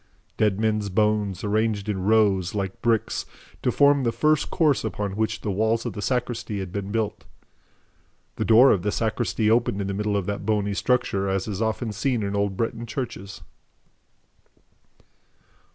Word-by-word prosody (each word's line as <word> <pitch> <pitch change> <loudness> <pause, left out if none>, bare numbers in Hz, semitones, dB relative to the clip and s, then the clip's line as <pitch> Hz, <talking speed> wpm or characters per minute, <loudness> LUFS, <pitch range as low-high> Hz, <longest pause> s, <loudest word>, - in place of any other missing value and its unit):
Dead 105 -2 +1
men's 105 -2 0
bones, 105 -1 0
arranged 105 0 0
in 100 -3 -2
rows, 100 -3 +2
like 95 -2 -3
bricks, 115 -2 0 0.3
to - - +1
form 140 0 +4
the 120 -3 +1
first 150 +6 +1
course 155 -6 +2
upon 105 -3 -3
which 110 +1 -1
the 105 - -2
walls 110 +4 0
of 120 - -3
the 105 - -6
sacristy 120 -2 -2
had 95 -2 -5
been 100 0 -4
built. 110 -1 -2 1.1
The - - -1
door 120 +4 +7
of 95 - +2
the 105 +3 -1
sacristy 110 0 0
opened 115 -3 +2
in 100 - -2
the 100 - -3
middle 105 +1 -1
of 100 - -2
that 100 0 -3
bony 105 -1 0
structure, 100 -4 0
as 95 +1 -1
is 105 0 -4
often 110 +1 -1
seen 115 +2 -1
in 100 0 -2
old 100 -1 -1
Breton 115 +1 -2
churches. 100 - -6
105 Hz, 170 wpm, -24 LUFS, 100-115 Hz, 1.1 s, door